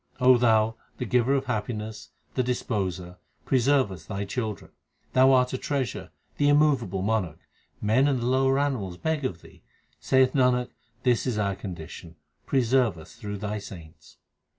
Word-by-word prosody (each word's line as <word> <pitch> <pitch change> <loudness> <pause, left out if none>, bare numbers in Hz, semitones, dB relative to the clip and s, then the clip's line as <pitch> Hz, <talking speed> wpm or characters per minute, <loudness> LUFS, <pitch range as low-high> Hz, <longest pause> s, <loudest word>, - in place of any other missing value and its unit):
Thou, 115 -3 +4 0.2
the 125 - -3
Giver 125 +3 +2
of 135 0 -1
happiness, 110 -2 -4 0.2
the 130 - +1
Disposer, 95 -8 -2 0.3
preserve 130 -3 +3
us 85 -4 -10
Thy 100 +1 -4
children. 110 0 -4 0.4
Thou 130 +1 +6
art 125 -1 +3
a 130 - -2
treasure, 140 -3 -3 0.3
the 145 - +3
immovable 145 -11 +2
Monarch; 100 -7 -1 0.5
men 120 +7 +3
and 135 -3 +1
the 120 - -3
lower 135 +1 +2
animals 125 -11 -1
beg 160 - -1
of 85 -9 -4
Thee. - - -17 0.4
Saith 130 -1 +3
Nanak, 125 -2 +2 0.3
this 125 0 +2
is 120 -4 -1
our 100 -2 0
condition; 85 -3 -9 0.3
preserve 125 -6 +2
us 80 - -13
through 105 -3 -6
Thy 105 +1 -3
saints. 85 -6 -12
120 Hz, 150 wpm, -26 LUFS, 100-130 Hz, 0.5 s, Thou